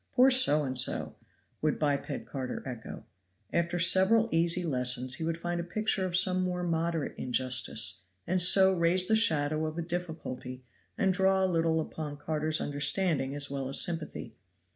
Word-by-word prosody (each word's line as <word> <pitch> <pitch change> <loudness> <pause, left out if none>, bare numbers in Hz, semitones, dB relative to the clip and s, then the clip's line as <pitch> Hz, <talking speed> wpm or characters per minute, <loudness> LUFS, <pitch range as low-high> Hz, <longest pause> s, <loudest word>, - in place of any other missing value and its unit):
"Poor 260 +2 +5
so 205 - +5
and 130 -2 -4
so!" 125 - 0 0.5
would 155 -1 0
biped 140 -2 -2
Carter 130 -2 -6
echo. 120 -4 -8 0.5
After 170 +1 0
several 190 +6 +4
easy 170 +2 +2
lessons 125 -4 0
he 160 - -4
would 165 0 -2
find 175 +1 -4
him 170 - -5
a - - -24
picture 215 -3 -1
of 175 -1 0
some 185 0 +2
more 180 -1 -3
moderate 165 -2 -2
injustice, 125 -4 -1 0.3
and 185 +1 0
so 190 +2 +5
raise 180 +1 +1
the 220 - +3
shadow 155 -7 +1
of 155 +1 -7
a 170 - -3
difficulty 160 -7 -6 0.3
and 190 -1 +1
draw 190 0 +2
a - - +3
little 165 -2 0
upon 155 -2 -6
Carter's 155 +1 -1
understanding 145 0 +1
as 145 -1 -2
well 135 -1 -4
as 135 - +3
sympathy. 165 -3 -2
165 Hz, 170 wpm, -29 LUFS, 145-180 Hz, 0.5 s, Poor